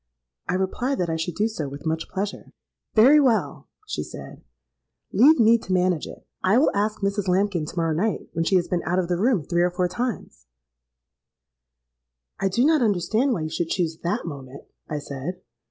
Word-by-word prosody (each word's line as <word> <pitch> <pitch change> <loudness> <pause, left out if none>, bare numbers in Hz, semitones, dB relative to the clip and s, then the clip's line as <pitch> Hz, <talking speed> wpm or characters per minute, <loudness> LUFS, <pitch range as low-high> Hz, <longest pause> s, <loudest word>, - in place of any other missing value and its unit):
'—I 180 - +1
replied 240 +8 -1
that 175 -2 -1
I - - -1
should 160 +1 -3
do 215 - +1
so 165 -11 -4
with 140 +3 -10
much 160 0 -2
pleasure.—'Very 215 +6 +1
well,' 255 -6 0 0.2
she - - -3
said; - - -10 0.7
'leave 295 +4 +6
me 230 +1 +5
to 190 - -8
manage 180 -3 +1
it. - - -12 0.2
I 190 +5 +4
will 280 - +4
ask 210 +1 -1
Mrs. 200 0 -1
Lambkin 185 -3 +1
to - - -9
morrow 165 -1 +1
night, 200 +7 -1
when 165 - 0
she 190 - +1
has 175 -2 +2
been 175 -1 -1
out 180 - -1
of 180 -2 0
the 175 -1 0
room 220 - +2
three 170 +3 0
or 175 - +3
four 180 0 0
times——.'—'I - - -9
do 235 +8 +2
not 310 -2 +4
understand 215 +5 +1
why 175 - -2
you 155 - -3
should 165 0 -2
choose 165 -3 -1
that 190 +7 -2
moment,' 140 -4 -8 0.2
I 150 - -2
said. 145 +4 -6
180 Hz, 185 wpm, -24 LUFS, 145-210 Hz, 0.7 s, leave